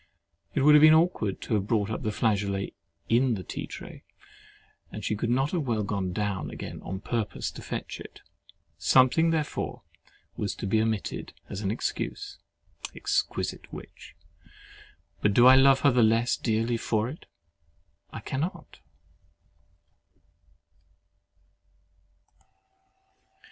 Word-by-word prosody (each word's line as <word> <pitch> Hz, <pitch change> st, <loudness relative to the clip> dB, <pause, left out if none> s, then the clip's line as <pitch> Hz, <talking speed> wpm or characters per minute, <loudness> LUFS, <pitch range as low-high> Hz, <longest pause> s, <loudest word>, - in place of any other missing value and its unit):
It 145 Hz, -, +2 dB
would 150 Hz, +2 st, +7 dB
have 150 Hz, -, +8 dB
been 155 Hz, 0 st, +8 dB
awkward 160 Hz, -, +1 dB
to -, -, -3 dB
have 100 Hz, -2 st, 0 dB
brought 105 Hz, -2 st, +1 dB
up 110 Hz, -, -3 dB
the 110 Hz, -, -1 dB
flageolet 100 Hz, -3 st, 0 dB, 0.3 s
in 120 Hz, +1 st, +3 dB
the 95 Hz, -, -6 dB
tea -, -, -6 dB
tray -, -, -10 dB, 0.9 s
and -, -, -7 dB
she 105 Hz, -, 0 dB
could 115 Hz, +2 st, -2 dB
not 135 Hz, +4 st, +1 dB
have 165 Hz, -7 st, -1 dB
well 110 Hz, -3 st, 0 dB
gone 100 Hz, -2 st, -2 dB
down 105 Hz, 0 st, -2 dB
again -, -, -7 dB
on 95 Hz, +1 st, -6 dB
purpose 115 Hz, -2 st, -3 dB
to -, -, -10 dB
fetch -, -, -5 dB
it. -, -, -11 dB, 0.6 s
Something, 130 Hz, +6 st, +4 dB
therefore, 155 Hz, -3 st, -2 dB, 0.5 s
was 100 Hz, -, -3 dB
to -, -, -5 dB
be 110 Hz, +3 st, +2 dB
omitted 110 Hz, -2 st, -2 dB, 0.2 s
as 100 Hz, -, -4 dB
an 100 Hz, -, -1 dB
excuse. 110 Hz, -, -4 dB, 0.6 s
Exquisite -, -, -2 dB
witch! -, -, -11 dB, 1.1 s
But 105 Hz, -1 st, +2 dB
do 120 Hz, -, +7 dB
I 130 Hz, +1 st, +9 dB
love 135 Hz, 0 st, +6 dB
her 140 Hz, -, +5 dB
the 125 Hz, 0 st, +3 dB
less 115 Hz, +2 st, +3 dB
dearly 115 Hz, +1 st, 0 dB
for 110 Hz, -1 st, 0 dB
it? 145 Hz, +6 st, -9 dB, 0.8 s
I -, -, -8 dB
cannot. 155 Hz, +7 st, -4 dB
115 Hz, 135 wpm, -27 LUFS, 105-135 Hz, 1.1 s, I